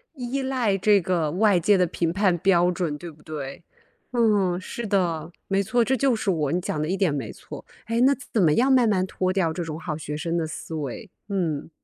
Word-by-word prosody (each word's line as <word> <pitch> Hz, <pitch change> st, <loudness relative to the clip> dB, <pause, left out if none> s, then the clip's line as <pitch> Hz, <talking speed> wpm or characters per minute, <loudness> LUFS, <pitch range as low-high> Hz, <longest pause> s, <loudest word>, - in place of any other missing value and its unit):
依 260 Hz, +1 st, -3 dB
赖 255 Hz, -7 st, 0 dB
这 205 Hz, +1 st, +4 dB
个， 165 Hz, -4 st, 0 dB
外 200 Hz, 0 st, +3 dB
界 200 Hz, +4 st, +4 dB
的 180 Hz, -, +3 dB
评 165 Hz, -1 st, -1 dB
判 185 Hz, -1 st, +2 dB
标 180 Hz, -1 st, +3 dB
准， 170 Hz, -5 st, -2 dB
对 170 Hz, +2 st, -8 dB
不 150 Hz, 0 st, -20 dB
对？ 145 Hz, 0 st, -7 dB, 0.5 s
嗯， 205 Hz, -7 st, +2 dB
是 220 Hz, +4 st, -6 dB
的， 175 Hz, -5 st, 0 dB, 0.2 s
没 195 Hz, 0 st, +1 dB
错， 240 Hz, +5 st, +2 dB
这 265 Hz, -, +2 dB
就 265 Hz, -2 st, +2 dB
是 210 Hz, -3 st, 0 dB
我， 150 Hz, -5 st, 0 dB
你 175 Hz, -, +1 dB
讲 150 Hz, -3 st, -3 dB
的 155 Hz, -, -1 dB
一 190 Hz, +4 st, -1 dB
点 180 Hz, -6 st, +2 dB
没 135 Hz, -7 st, -4 dB
错。 -, -, -10 dB, 0.2 s
诶， 230 Hz, +1 st, 0 dB
那 265 Hz, +2 st, +6 dB, 0.2 s
怎 215 Hz, -, +3 dB
么 155 Hz, -3 st, +4 dB
样 260 Hz, -, +3 dB
慢 245 Hz, -3 st, +4 dB
慢 185 Hz, -3 st, +2 dB
脱 185 Hz, 0 st, -1 dB
掉 175 Hz, -4 st, +1 dB
这 175 Hz, -, -3 dB
种 160 Hz, -1 st, -6 dB
好 155 Hz, -, -4 dB
学 150 Hz, -1 st, -5 dB
生 170 Hz, +1 st, -2 dB
的 165 Hz, -2 st, -1 dB
思 160 Hz, -, -7 dB
维？ 155 Hz, -, -5 dB, 0.2 s
嗯。 165 Hz, -8 st, -2 dB
185 Hz, 245 characters per minute, -24 LUFS, 160-210 Hz, 0.5 s, 那